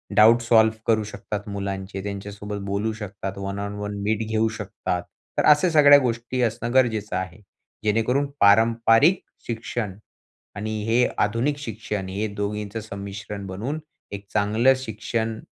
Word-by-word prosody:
Doubt 115 +2 +7
solve 110 -1 +4
करू 110 -1 +3
शकतात 105 0 -6
मुलांचे, 100 -1 -4
त्यांच्यासोबत 105 +1 -5
बोलू 100 +3 -1
शकतात, 100 -2 -6
वन 100 0 -4
ऑन 100 0 -4
वन 105 0 -4
मीट 110 +1 0
घेऊ 110 0 +1
शकतात. - - -3 0.4
तर - - +2
अशा 150 +4 +6
सगळ्या 145 -3 +8
गोष्टी 120 0 -2
असणं 115 0 -1
गरजेचं 110 -5 +2
आहे. 95 +1 -4 0.4
जेणेकरून 115 +6 +2
पारंपरिक 115 - +5 0.3
शिक्षण 115 -3 -3 0.6
आणि 110 +1 -3
हे 120 +2 +3
आधुनिक 115 +8 +1
शिक्षण 105 -6 -4
हे 100 +3 -2
दोघींचं 105 +1 -3
संमिश्रण 100 -1 -7
बनवून 115 +12 -4 0.3
एक 100 0 -7
चांगलं 110 +6 +4
शिक्षण 115 -2 -3
110 Hz, 135 wpm, -24 LUFS, 100-115 Hz, 0.6 s, सगळ्या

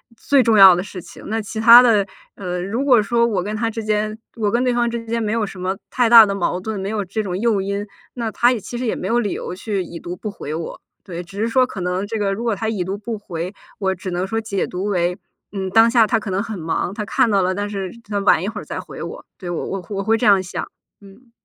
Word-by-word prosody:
最 275 +4 +3
重 225 -3 +3
要 190 -2 +10
的 175 - -1
事 190 -1 -8
情， - - -13
那 220 +1 -1
其 220 +1 -6
他 235 +2 +10
的， 215 -5 +3 0.3
呃， 180 -2 -4
如 225 +9 -2
果 250 -5 +5
说 235 +3 +2
我 200 -6 -1
跟 210 +3 -4
他 225 +1 -1
之 225 0 -5
间 215 0 -1 0.2
我 215 -2 +1
跟 235 +4 +1
对 250 -1 +1
方 240 0 +1
之 235 0 -5
间 230 +1 -2
没 215 -1 -1
有 225 -2 0
什 195 -2 -9
么 185 +1 -2
太 245 -2 +2
大 230 -1 +10
的 200 - -2
矛 185 -2 -1
盾， 215 +1 -4
没 190 - -4
有 215 -1 -1
这 195 +4 -3
种 185 -4 -3
诱 220 -1 +1
因， 200 +1 -2 0.3
那 230 -3 -3
他 240 +3 +3
也 230 - -4
其 240 - -7
实 250 - -3
也 225 - 0
没 - - -4
有 235 +1 +2
理 210 -5 -1
由 - - -5
去 195 +1 -3
已 170 -1 -9
读 175 +2 -6
不 210 +3 -6
回 150 -6 -7
我。 165 0 -6 0.2
对， 175 -3 -6
只 180 +3 -12
是 225 - +1
说 255 +2 +3
可 195 - -7
能 180 +3 -2
这 225 +1 -3
个 200 -2 0
如 225 +4 -4
果 230 -3 +1
他 220 +3 -2
已 200 -5 -2
读 195 +2 -3
不 220 +2 -5
回， 180 -2 -5 0.3
我 190 -2 0
只 185 +1 -6
能 180 +1 -1
说 225 +3 -2
解 210 -3 -2
读 185 +2 -5
为， 180 -3 0 0.3
嗯， 190 -2 -3
当 225 +3 +6
下 230 -3 +5
他 230 - +2
可 210 -3 -5
能 190 +1 0
很 220 -1 -5
忙， 165 +2 -2
他 210 +1 -4
看 210 - +2
到 200 -2 +3
了， 185 0 +1
但 205 +2 -3
是 195 -3 -4 0.2
他 205 -1 -1
晚 195 -5 +4
一 190 - -3
会 210 -1 -5
儿 - - -10
再 - - -6
回 - - -8
我。 - - -8
对， 180 - -7
我 175 - -3
我 195 -2 -5
我 200 -2 -2
会 220 +3 +3
这 235 - -1
样 200 -3 +6
想。 180 - -5 0.4
嗯。 205 +5 -17
205 Hz, 305 characters per minute, -20 LUFS, 190-225 Hz, 0.4 s, 要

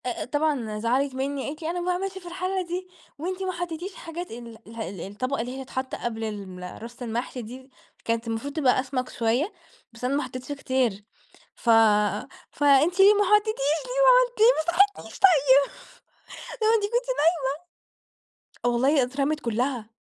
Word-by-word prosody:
أ-أ 245 - -2
طبعًا 260 -6 -1
زعلت 255 +4 0
مِنّي، 270 +1 -2
قالت 300 +3 -6
لي: 320 - -3
"أنا 355 +1 -2
ما 350 - -4
باعملش 375 +2 -2
في 360 -2 -10
الحلّة 370 +2 -2
دي، 360 +1 -4 0.3
وأنتِ 365 +5 -4
ما 375 - -1
حطيتيش 350 +1 -5
حاجات" 340 +2 -7
ال 230 -1 -9
الح 230 +1 -10
ال 190 -4 -5
الطبقة 255 +7 -3
اللي 250 +3 -5
هي 265 - -6
تتحط 260 0 -4
قبل 225 -1 -4
ال 195 -3 -7
رص 235 +2 -10
المحشي 240 +2 -3
دي؛ 255 +4 -10 0.4
كانت 230 0 -1
المفروض 230 +5 -3
تبقى 275 -6 +3
أسمك 255 -1 -2
شوية، 240 - 0 0.4
بس 230 - -14
أنا 255 +3 +1
ما 290 - 0
حطيتش 255 +2 -7
كتير. 260 -7 -1 0.5
"ف 235 - -4 0.8
فأنت 290 +5 +3
ليه 395 +2 +8
ما 415 0 +3
حطيتيش، 420 +2 +3
ليه 280 +2 +2 0.4
ما - - +7
عملمتي - - 0
ليه 485 +2 +8
ما - - 0 0.4
صحيتينيش 220 - -11
طيب؟" 285 -7 +5 0.9
ما 435 - +4
أنتِ 430 - -2
كنتِ 480 +4 0 1.4
نايمة 245 0 -3
والله 270 +3 +3
أترمِت 275 +4 -1
كلها، 240 -1 -2
275 Hz, 170 wpm, -25 LUFS, 235-350 Hz, 1.4 s, ليه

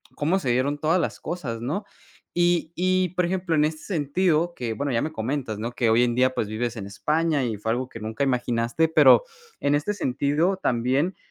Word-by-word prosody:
cómo 165 +6 +1
se 130 -8 -3
dieron 130 +4 +1
todas 160 +5 +2
las 160 - -3
cosas, 135 -9 -4
¿no? 190 - -3 0.5
Y 175 -1 +1
y 185 0 +1
por 180 - +2
ejemplo, 180 -1 -1
en 150 - +3
este 155 +1 -2
sentido 170 0 0
que, 120 -7 -4
bueno, 140 +4 -2
ya 115 - +1
me 155 - -3
comentas, 120 -3 -3
¿no? 115 +3 -4
Que 120 -1 0
hoy 115 +2 +4
en 120 -1 +1
día, 130 +1 +2
pues, 105 - -1
vives 120 +2 -2
en 100 -4 -6
España, 150 +6 0
y 115 - -2
fue 110 +2 -2
algo 125 +2 -1
que 115 - -10
nunca 110 +5 -2
imaginaste. 120 +3 0
Pero, 160 - +6 0.4
en 140 - +2
este 145 +8 0
sentido, 155 +2 0
también, 130 +5 0
145 Hz, 205 wpm, -24 LUFS, 120-170 Hz, 0.5 s, Pero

